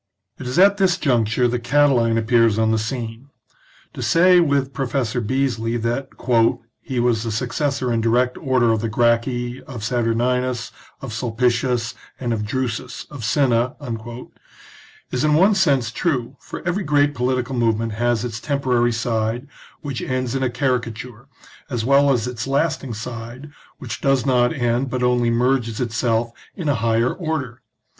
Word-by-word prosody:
It 130 Hz, -, -6 dB
is 125 Hz, -, -3 dB
at 200 Hz, +2 st, +6 dB
this 185 Hz, -2 st, +2 dB
conjuncture 120 Hz, -, +2 dB
that 120 Hz, 0 st, -2 dB
Catiline 125 Hz, -4 st, +3 dB
appears 115 Hz, -1 st, +3 dB
on 110 Hz, 0 st, +2 dB
the 110 Hz, -, +2 dB
scene. 115 Hz, +2 st, -5 dB, 0.6 s
To -, -, -7 dB
say, 180 Hz, +2 st, +5 dB
with 140 Hz, -4 st, +1 dB
Professor 125 Hz, -2 st, -1 dB
Beesly, 120 Hz, -1 st, -1 dB
that 120 Hz, +4 st, -2 dB, 0.6 s
" -, -, -54 dB
he 130 Hz, -2 st, -3 dB
was 120 Hz, -2 st, +2 dB
the 115 Hz, 0 st, -3 dB
successor 130 Hz, +2 st, -1 dB
in 115 Hz, -, +1 dB
direct 120 Hz, +2 st, +2 dB
order 130 Hz, -5 st, +2 dB
of 110 Hz, -1 st, 0 dB
the 115 Hz, -, -2 dB
Gracchi, 120 Hz, +2 st, 0 dB
of 120 Hz, -5 st, -8 dB
Saturninus, 120 Hz, +1 st, 0 dB, 0.3 s
of 135 Hz, -5 st, -6 dB
Sulpicius, 120 Hz, +1 st, 0 dB, 0.3 s
and 120 Hz, -2 st, -1 dB
of 105 Hz, -1 st, -3 dB
Drusus, 125 Hz, +1 st, -3 dB
of 140 Hz, -5 st, -8 dB
Cinna," 125 Hz, 0 st, +2 dB, 1.4 s
is 125 Hz, -, -1 dB
in 150 Hz, -1 st, +3 dB
one 190 Hz, +6 st, +5 dB
sense 140 Hz, -, +2 dB
true, 130 Hz, -9 st, -1 dB
for -, -, -8 dB
every 185 Hz, +3 st, 0 dB
great 145 Hz, -2 st, +2 dB
political 130 Hz, 0 st, -1 dB
movement 115 Hz, -2 st, +1 dB
has 120 Hz, +1 st, 0 dB
its 115 Hz, -1 st, -5 dB
temporary 125 Hz, -4 st, +1 dB
side, 115 Hz, +2 st, -1 dB, 0.3 s
which 140 Hz, -4 st, -4 dB
ends 130 Hz, -2 st, -2 dB
in 135 Hz, -, -1 dB
a 130 Hz, -, +1 dB
caricature, 120 Hz, -2 st, -3 dB, 0.4 s
as 120 Hz, -5 st, -2 dB
well 140 Hz, +1 st, +4 dB
as 120 Hz, -4 st, +1 dB
its 125 Hz, -1 st, -4 dB
lasting 135 Hz, -3 st, -1 dB
side, 120 Hz, +5 st, -7 dB, 0.3 s
which -, -, -7 dB
does 135 Hz, -2 st, +2 dB
not 125 Hz, -2 st, +3 dB
end, 125 Hz, -2 st, 0 dB
but 125 Hz, 0 st, -2 dB
only 125 Hz, -1 st, +2 dB
merges 120 Hz, -1 st, +1 dB
itself 115 Hz, -1 st, 0 dB, 0.2 s
in 175 Hz, -5 st, -4 dB
a 145 Hz, -, +3 dB
higher 115 Hz, +1 st, +1 dB
order. 155 Hz, -9 st, -4 dB
125 Hz, 160 wpm, -21 LUFS, 115-135 Hz, 1.4 s, at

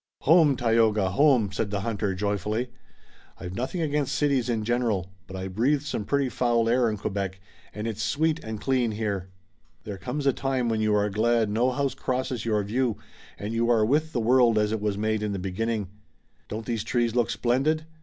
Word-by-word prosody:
"Home, 155 Hz, -2 st, +5 dB
Tayoga! 110 Hz, -4 st, +2 dB
Home!" 125 Hz, -4 st, +3 dB
said 100 Hz, +2 st, -2 dB
the 100 Hz, -1 st, -2 dB
hunter, 105 Hz, -3 st, -2 dB
joyfully. 105 Hz, +5 st, -2 dB, 0.7 s
"I've 90 Hz, 0 st, -7 dB
nothing 130 Hz, -, -3 dB
against 145 Hz, -3 st, 0 dB
cities 135 Hz, -5 st, +1 dB
in 115 Hz, -2 st, 0 dB
general, 110 Hz, -6 st, 0 dB, 0.2 s
but 95 Hz, -, -9 dB
I 95 Hz, 0 st, -4 dB
breathed 130 Hz, +10 st, +1 dB
some 125 Hz, -7 st, -3 dB
pretty 140 Hz, +2 st, +1 dB
foul 120 Hz, -2 st, +1 dB
air 120 Hz, 0 st, +3 dB
in 105 Hz, -, -3 dB
Quebec, 95 Hz, -2 st, -3 dB, 0.3 s
and 105 Hz, +2 st, -6 dB
it's 110 Hz, -1 st, -3 dB
sweet 155 Hz, +9 st, 0 dB
and 110 Hz, -1 st, -5 dB
clean 125 Hz, -3 st, +1 dB
here. 100 Hz, -4 st, -3 dB, 0.5 s
There 100 Hz, -2 st, -7 dB
comes 135 Hz, +6 st, -4 dB
a 135 Hz, -, +4 dB
time 130 Hz, -3 st, -1 dB
when 110 Hz, -1 st, 0 dB
you 105 Hz, -1 st, +2 dB
are 105 Hz, 0 st, +2 dB
glad 110 Hz, +1 st, +2 dB
no 120 Hz, +4 st, +2 dB
house 140 Hz, +1 st, -1 dB
crosses 130 Hz, -1 st, -3 dB
your 105 Hz, -2 st, +1 dB
view 120 Hz, +2 st, 0 dB, 0.4 s
and 105 Hz, +2 st, -5 dB
you 115 Hz, +1 st, +1 dB
are 110 Hz, -3 st, +4 dB
with 155 Hz, +6 st, +1 dB
the 125 Hz, -, -1 dB
world 120 Hz, -1 st, +4 dB
as 105 Hz, 0 st, +2 dB
it 110 Hz, -1 st, -2 dB
was 105 Hz, -1 st, -1 dB
made 110 Hz, 0 st, 0 dB
in 105 Hz, -1 st, -2 dB
the -, -, -2 dB
beginning. 100 Hz, +3 st, -2 dB, 0.6 s
Don't 110 Hz, +1 st, -5 dB
these 115 Hz, -3 st, -2 dB
trees 120 Hz, -2 st, 0 dB
look 120 Hz, -2 st, +1 dB
splendid! 140 Hz, +6 st, +1 dB
115 Hz, 195 wpm, -26 LUFS, 105-130 Hz, 0.7 s, Home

